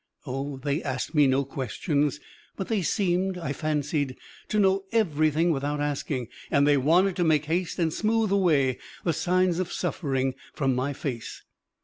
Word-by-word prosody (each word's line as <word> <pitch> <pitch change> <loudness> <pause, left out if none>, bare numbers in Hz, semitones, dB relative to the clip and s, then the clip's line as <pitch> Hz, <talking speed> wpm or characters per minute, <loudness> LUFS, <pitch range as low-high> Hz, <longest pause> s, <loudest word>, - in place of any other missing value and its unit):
Oh, 135 +1 -4
they 140 +3 -1
asked 130 +4 -3
me 150 -3 +5
no 135 +1 +2
questions, 145 - -1 0.4
but 195 - -5
they 220 -4 +1
seemed, 185 +1 0
I 160 -5 -3
fancied, 150 -3 -1 0.3
to 215 - -1
know 195 -1 +3
everything 160 -6 +2
without 145 0 -1
asking, 145 -3 -2 0.2
and 140 0 +3
they 145 - +5
wanted 175 +8 +3
to 175 - +2
make 155 -2 +3
haste 170 +3 -1
and 165 -3 +1
smoothe 220 0 +1
away 150 -10 +3 0.2
the 170 - +1
signs 180 +1 +1
of 185 -2 -2
suffering 135 -4 -1 0.2
from 135 -3 +1
my 130 +3 -1
face. 125 -5 -5
150 Hz, 160 wpm, -26 LUFS, 140-180 Hz, 0.4 s, me